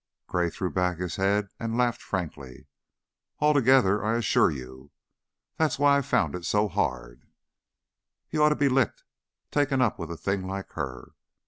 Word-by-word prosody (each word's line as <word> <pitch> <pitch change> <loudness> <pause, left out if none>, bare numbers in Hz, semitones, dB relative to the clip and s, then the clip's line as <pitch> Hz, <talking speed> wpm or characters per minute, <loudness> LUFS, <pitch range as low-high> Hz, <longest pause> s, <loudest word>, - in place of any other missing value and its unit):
Gray 90 -1 0
threw 90 +2 -4
back 90 -2 0
his 90 -1 -4
head 100 +1 +1
and 115 0 -3
laughed 120 -1 +1
frankly. 75 -9 -6 0.7
"Altogether, 130 -8 +4
I 110 +2 +1
assure 115 -6 +3
you. 65 -1 -8 0.7
That's 160 -1 +1
why 140 0 +4
I 140 - +2
found 125 -3 0
it 90 -1 -5
so 105 +4 +1
hard." - - -3 1.0
"He - - -3
oughta 150 0 +4
been 140 -3 +2
licked! 130 -4 +1 0.5
Takin' 145 -2 +1
up 125 -5 +1
with 85 - -5
a - - -4
a - - -9
thing 95 +4 -2
like 95 0 -5
her." 65 -5 -6
100 Hz, 160 wpm, -27 LUFS, 85-130 Hz, 1.0 s, Altogether